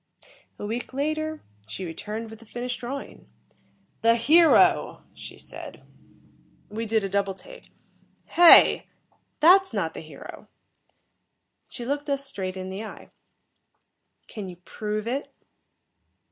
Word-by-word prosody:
A - - -6
week 235 +4 -5
later, 310 +2 -2 0.2
she 185 - -6
returned 215 +7 -6
with 220 - -11
the 230 - -16
finished 245 +2 -5
drawing. 270 +3 -7 0.7
"The 230 0 +5
hero," 315 +8 +4
she - - -11
said. - - -10 0.9
We 220 +2 -4
did 220 -1 +1
a - - -1
double 195 0 -1
take. - - -14 0.6
"Hey! 345 0 +7 0.5
That's 380 +4 +6
not - - -1
the - - -7
hero." - - -11 1.2
She 240 - -8
looked 285 +3 -3
us 275 0 -1
straight 190 -8 -4
in 185 0 -6
the 195 +3 -5
eye. 220 - -11 1.2
"Can 205 -4 -7
you 180 - -9
prove 215 0 -4
it?" 270 +4 -3
230 Hz, 125 wpm, -25 LUFS, 210-285 Hz, 1.2 s, Hey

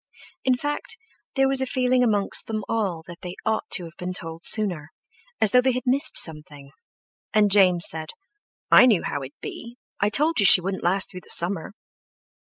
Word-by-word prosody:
In 260 -1 +2
fact, 290 - -5 0.4
there 270 -1 +2
was 270 0 +1
a 265 - -2
feeling 255 -1 0
amongst 205 -4 0
them 215 -2 -4
all 195 -8 -3
that 175 0 -12
they 180 -1 -8
ought 220 0 -2
to 180 - +4
have 165 -1 -12
been 180 +1 -5
told 165 -1 -7
sooner, 180 -9 +2 0.5
as 215 - +3
though 250 - +4
they 260 0 0
had 250 +1 -5
missed 275 +4 +2
something; 150 -3 -1 0.6
and 210 -1 +3
James 185 -4 +4
said: 155 0 -5 0.6
"I 250 - +7
knew 215 -8 +2
how 145 - -4
it'd 135 +1 -11
be; 235 +1 -9 0.2
I 205 - +1
told 300 +8 +1
you 200 - +2
she - - +8
wouldn't 190 +2 -5
last 190 +2 0
through 180 - -10
the - - -23
summer." 175 +2 -1
200 Hz, 190 wpm, -23 LUFS, 170-250 Hz, 0.6 s, she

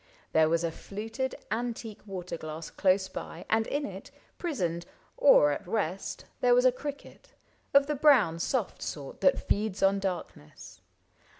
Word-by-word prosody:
There 160 0 +4
was 165 +1 +1
a 165 - 0
fluted 225 +9 -5 0.2
antique 225 -1 -3
water 180 -3 -5
glass 155 0 -7
Close 190 0 +2
by, 175 -2 -8
and 220 0 +3
in 290 0 -1
it, - - -8 0.3
prisoned, 175 - -2 0.3
or 145 - +6
at 145 - -4
rest. 190 -2 -2
There 245 -1 +5
was 250 +1 +4
a 255 - +7
cricket, 290 - -9 0.4
of 280 0 +6
the 300 - -1
brown 260 - +4
soft 230 +3 -1
sort 140 -3 -6
That 275 - +3
feeds 205 -2 0
on 195 +1 +4
darkness. 180 - -6
200 Hz, 155 wpm, -29 LUFS, 170-250 Hz, 0.4 s, a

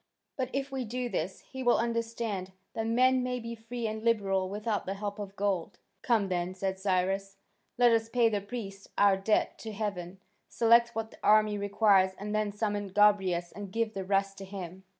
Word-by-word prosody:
But 255 -2 -2
if 275 0 -2
we 265 -1 -2
do 245 +2 -3
this, 185 -2 -3
he 265 - -9
will 245 -1 +4
understand 230 -5 -2 0.2
that 225 0 -2
men 255 +3 +4
may 250 0 -2
be 230 0 -6
free 230 +1 -6
and 220 0 -3
liberal 195 -5 +1
without 210 0 -2
the 195 - -2
help 205 +1 -5
of 200 -1 -6
gold." 195 -4 -1 0.2
"Come 225 -5 +2
then," 180 0 -2
said 190 0 -2
Cyrus, 195 +1 0 0.4
"let 245 -1 +6
us 225 0 +2
pay 235 0 +3
the 210 -2 0
priests 200 -2 -7
our 200 -1 +5
debt 195 +3 0
to 220 - -6
heaven, 195 -4 -4 0.3
select 235 0 +4
what 225 0 -3
the - - -16
army 215 0 +4
requires, 200 -2 +3
and 210 +1 -5
then 215 -1 0
summon 205 -1 -2
Gobryas 190 -3 +3
and 205 -2 -8
give 225 +1 -1
the 195 -2 -4
rest 195 +1 0
to 195 - -7
him." 190 -1 -8
205 Hz, 190 wpm, -30 LUFS, 195-230 Hz, 0.4 s, let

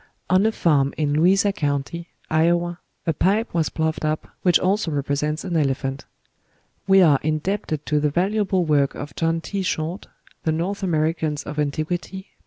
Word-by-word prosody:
On 190 +3 +5
a - - +2
farm 145 -9 +2
in 150 -2 0
Louisa 195 +6 +3
County, 145 +2 -2 0.2
Iowa, 170 +2 +1 0.3
a 165 - +1
pipe 210 +9 +1
was 160 -4 +1
ploughed 160 0 -2
up 155 0 -1
which 180 -2 +5
also 190 -1 +1
represents 150 +1 -1
an 175 - -3
elephant. 135 -2 -1 0.8
We 195 -1 +6
are 145 -5 +5
indebted 155 0 -2
to 150 -1 +1
the 150 0 +1
valuable 190 +2 +1
work 145 -3 +2
of 145 0 -7
John 165 0 0
T. 200 +3 -3
Short 175 +1 -3 0.4
("The 160 - +1
North 185 +6 -2
Americans 155 -4 0
of 150 0 -5
Antiquity," 155 +6 -2
p. - - -33
160 Hz, 165 wpm, -22 LUFS, 150-185 Hz, 0.8 s, We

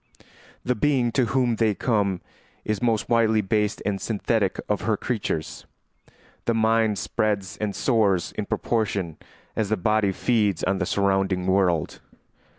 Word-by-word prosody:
The 125 - +2
being 125 0 +1
to 130 +1 +2
whom 125 -3 +1
they 110 -2 +2
come 100 -6 0 0.4
is 110 -2 -1
the 125 - -1
most 115 -3 +1
widely 115 -2 +3
based 105 +1 -1
and 100 -2 -1
synthetic 105 -2 0
of 105 - 0
her 110 0 0
creatures. 100 -10 -3 0.8
The 115 - +1
mind 110 -1 +2
spreads 100 -3 -1
and 105 -2 -3
soars 105 -8 +1
in 105 - -5
proportion 100 -8 -1 0.4
as 110 -3 -1
the 110 - +1
body 105 +1 +2
feeds 105 -3 +1
on 95 +1 +1
the - - -1
surrounding 95 -2 +1
world. 95 -4 +1
105 Hz, 150 wpm, -24 LUFS, 95-115 Hz, 0.8 s, widely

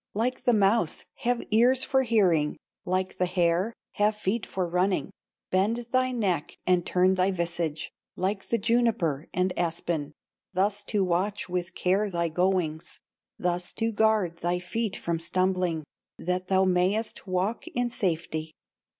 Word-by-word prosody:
"Like 240 +4 -1
the 245 - +5
mouse, 200 -4 +2
have 245 0 0
ears 245 +4 +5
for 265 -1 +2
hearing, 185 - +2 0.3
Like 185 +1 -1
the 180 - +2
hare, 175 +3 +1 0.2
have 210 +1 +2
feet 210 +1 -2
for 185 -2 -2
running, 180 +3 0 0.4
Bend 215 +6 +1
thy 255 0 +2
neck 195 -10 -1
and 180 -1 +3
turn 185 +2 +3
thy 185 0 +2
visage 170 -4 -2 0.2
Like 195 +2 -2
the 235 - +1
juniper 225 - +1
and 180 0 0
aspen, 165 -3 -1 0.4
Thus 200 +2 +1
to 205 -2 +1
watch 185 +3 0
with 180 0 -3
care 195 +3 +1
thy 170 -2 0
goings, 175 -2 -1 0.4
Thus 175 0 -1
to 225 0 -1
guard 210 -6 +2
thy 175 +1 0
feet 200 +3 -2
from 170 -1 -2
stumbling, 180 -1 0 0.3
That 180 +1 -2
thou 190 0 +3
mayest 190 +5 0
walk 185 +5 -1
in 245 0 -1
safety. 160 -6 -2
185 Hz, 145 wpm, -27 LUFS, 175-215 Hz, 0.4 s, the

